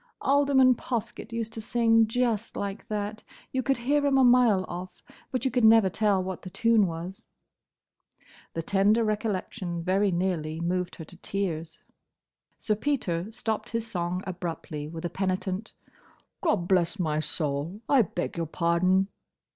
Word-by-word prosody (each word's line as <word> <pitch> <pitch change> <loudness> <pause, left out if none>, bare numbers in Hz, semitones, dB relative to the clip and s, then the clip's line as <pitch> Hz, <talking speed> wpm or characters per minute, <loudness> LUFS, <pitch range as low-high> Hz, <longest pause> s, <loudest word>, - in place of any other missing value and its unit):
"Alderman 275 -2 +5
Poskett 235 -1 -4
used 230 -1 -3
to 225 - -4
sing 225 0 +3
just 230 -2 -1
like 200 +2 -4
that. 210 -1 -3 0.3
You 260 - 0
could 270 +1 +1
hear 285 +5 +1
him 280 -1 +3
a 265 - +5
mile 240 -6 +5
off, 180 +1 -8 0.3
but 255 0 -2
you 265 - +2
could 250 -2 +1
never 220 -3 +6
tell 200 -2 +2
what 185 -1 -5
the 185 - -8
tune 225 0 +3
was." 170 +3 -7 1.3
The 165 - -2
tender 205 +5 +3
recollection 205 -4 -2
very 195 +3 +2
nearly 170 -3 -1
moved 180 +1 -1
her 160 - -8
to 175 - -13
tears. 170 -5 -4 0.7
Sir 215 - 0
Peter 210 -7 -1
stopped 225 -1 -3
his 230 -1 -2
song 180 -3 -2
abruptly, 170 -4 -5
with 160 +1 -7
a - - -1
penitent, 190 +2 -2 0.7
"Gobblessmysoul! 170 - 0
I 275 -3 +5
beg 175 -4 -3
your 165 -1 -1
pardon!" 180 +4 +2
195 Hz, 145 wpm, -27 LUFS, 175-230 Hz, 1.3 s, never